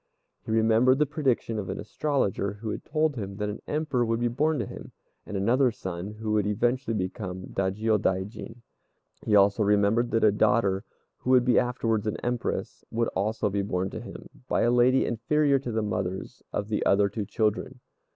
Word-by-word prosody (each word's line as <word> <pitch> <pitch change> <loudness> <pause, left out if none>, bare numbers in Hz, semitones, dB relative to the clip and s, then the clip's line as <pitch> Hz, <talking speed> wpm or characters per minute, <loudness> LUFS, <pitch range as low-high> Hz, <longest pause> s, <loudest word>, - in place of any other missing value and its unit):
He - - -11
remembered 115 +3 +4
the 150 - +3
prediction 135 -7 -1
of 95 - -5
an - - -4
astrologer 105 -6 -1
who 105 +1 -5
had - - -5
told 155 -1 0
him 100 -4 -5
that 105 0 -2
an 105 - -6
Emperor 150 -5 0
would 115 0 0
be 120 0 +1
born 150 +6 +1
to - - -1
him, - - -10 0.3
and 105 - -4
another 125 +7 +3
son 95 -4 -6
who 110 0 -4
would 105 -1 +2
eventually 120 +3 0
become 95 -1 -4
a - - -8
Dajiôdaijin. 105 +3 -1 0.6
He 105 - +2
also 100 +2 +4
remembered 105 +3 +3
that 115 - +1
a 105 - +6
daughter, 105 -2 +2 0.3
who - - -5
would 125 -1 +5
be 125 - +5
afterwards 115 -3 -1
an 105 - -1
Empress, 120 -1 -3
would 115 0 0
be - - -17
also 105 +3 0
born 95 -1 -1
to 110 - -6
him, 120 - -10 0.2
by - - +1
a 120 - +3
lady 125 +2 +4
inferior 140 +5 +2
to 125 -2 -5
the 110 -1 -1
mothers 95 -2 -4
of 105 +1 -3
the 105 - 0
other 100 +1 +4
two 100 0 -4
children. 110 +3 -1
110 Hz, 190 wpm, -27 LUFS, 100-125 Hz, 0.6 s, a